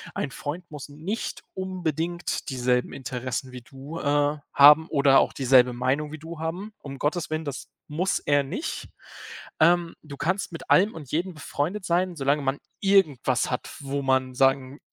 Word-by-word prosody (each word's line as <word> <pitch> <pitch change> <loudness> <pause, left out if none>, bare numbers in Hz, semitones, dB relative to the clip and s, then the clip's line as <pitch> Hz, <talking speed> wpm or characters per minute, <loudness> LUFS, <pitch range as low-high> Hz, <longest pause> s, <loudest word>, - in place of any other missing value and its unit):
ein 140 - -2
Freund 170 +7 -6
muss 150 -2 -7
nicht 165 +10 -5
unbedingt 175 -2 -3
dieselben 125 -1 0
Interessen 130 0 -4
wie 125 -1 -9
du, 135 +7 -9
äh, 145 +1 +1 0.2
haben 150 +3 +8
oder 140 -2 +5
auch - - +1
dieselbe 125 -2 +4
Meinung 135 +5 -1
wie - - -5
du 160 0 -9
haben. 180 +7 -4
Um 140 -1 -8
Gottes 160 +3 -1
Willen, 155 +1 -2
das 140 -2 -6 0.2
muss 170 +6 0
er 145 -1 +2
nicht. 215 - -5 0.7
Ähm, 170 +1 +3
du 145 -2 -9
kannst 185 +2 -1
mit 165 - -9
allem 200 +4 +5
und 145 -5 -10
jedem 175 +4 -1
befreundet 170 +6 -3
sein, 175 +1 +1
solange 140 +1 +1
man 135 +1 -1 0.2
irgendwas 150 - +2
hat, 125 - -3
wo 140 0 -3
man 130 -1 +1
sagen 135 +1 +2
145 Hz, 165 wpm, -25 LUFS, 135-170 Hz, 0.7 s, haben